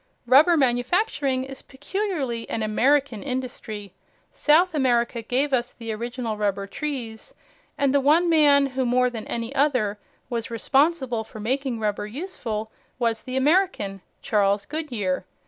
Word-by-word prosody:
Rubber 295 +8 +6
manufacturing 265 - +1
is 270 0 -8
peculiarly 285 - -3
an 220 - -2
American 255 +2 +2
industry. 245 -7 -5 0.4
South 335 +4 +3
America 240 -4 +1
gave 265 +5 0
us 245 -1 0
the 230 -2 -6
original 235 0 -4
rubber 200 -1 -1
trees, 235 -2 -5 0.4
and 280 -1 +2
the 285 - +5
one 315 +6 +4
man 295 -4 +5
who, 260 -1 -2
more 250 0 +2
than 225 -3 -6
any 235 +2 -3
other, 255 -8 +1 0.3
was 235 -2 -3
responsible 265 0 +1
for 220 - -11
making 255 +2 -1
rubber 210 -1 -2
useful 225 - -5 0.3
was 230 -3 0
the 255 0 -4
American, 265 - +1 0.2
Charles 200 -4 +1
Goodyear. 240 - -2
255 Hz, 135 wpm, -24 LUFS, 225-285 Hz, 0.4 s, Rubber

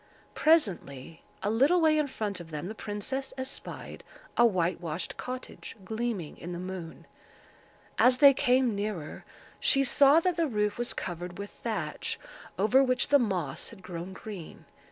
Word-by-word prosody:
Presently, 170 - +1 0.2
a 205 - +1
little 275 +11 +4
way 315 -2 +4
in 300 - +1
front 210 -7 -4
of 170 -2 -10
them, 155 +2 -5
the - - -5
princess 225 +6 -4
espied 260 +1 -6 0.3
a 235 - +5
whitewashed 175 -5 0
cottage, 255 0 -7
gleaming 220 -6 -3
in 175 +1 -6
the - - -4
moon. 180 -2 -7 0.9
As 250 0 +6
they 280 0 +8
came 250 -2 +2
nearer, 200 -6 -4 0.3
she 275 -1 +3
saw 280 +3 +6
that 360 -1 0
the 335 -1 +2
roof 210 -3 -1
was 240 - -2
covered 175 0 -5
with 200 0 -6
thatch, - - -4 0.4
over 245 +7 +4
which 255 -1 +1
the 285 0 +6
moss 180 - -2
had 190 - -14
grown 175 +1 -6
green. 190 -4 -9
210 Hz, 155 wpm, -29 LUFS, 180-265 Hz, 0.9 s, they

